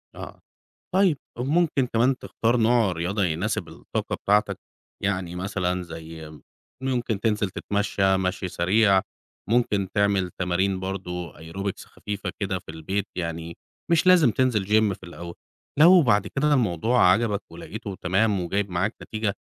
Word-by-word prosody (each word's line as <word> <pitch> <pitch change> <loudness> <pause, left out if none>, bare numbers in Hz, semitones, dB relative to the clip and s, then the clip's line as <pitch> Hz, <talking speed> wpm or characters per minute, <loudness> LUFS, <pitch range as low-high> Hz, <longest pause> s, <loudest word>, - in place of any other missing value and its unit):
آه، - - -9 0.6
طيب، 185 -7 +4 0.2
وممكن 140 +1 +1
كمان 125 +3 +2
تختار 115 +2 0
نوع 115 -3 +3
رياضة 90 +4 -1
يناسب 90 +6 -1
الطاقة - - -4
بتاعتك، 105 -1 +2 0.4
يعني 90 -3 -2
مثلًا 90 -1 -2
زي 80 -1 -9
إمم، 75 -3 -14 0.4
ممكن 120 -6 -1
تنزِل 105 -3 0
تتمشّى 100 -1 0
مشْي 95 0 -2
سريع، 95 +3 +3 0.5
ممكن 105 -5 +2
تعمل 100 -3 +2
تمارين 95 +1 0
برضو 90 -3 -5
aerobics 95 +5 -6
خفيفة 105 -1 -5
كده 95 -2 -1
في 85 - -12
البيت، 95 +6 -3
يعني 85 -1 -4 0.3
مش 170 +1 +3
لازم 175 -8 +6
تنزِل 115 -5 +1
gym 105 -1 +3
في 95 - -11
الأول. 85 0 -8 0.4
لو 175 +3 +8
بعد 105 -7 +2
كده 150 +2 +1
الموضوع 110 - +3
عجبك 105 -1 +1
ولقيته 100 +3 -7
تمام 100 +2 +1
وجايب 95 +3 -1
معاك 95 +6 -1
نتيجة، 110 -2 -2
100 Hz, 140 wpm, -25 LUFS, 90-115 Hz, 0.6 s, لو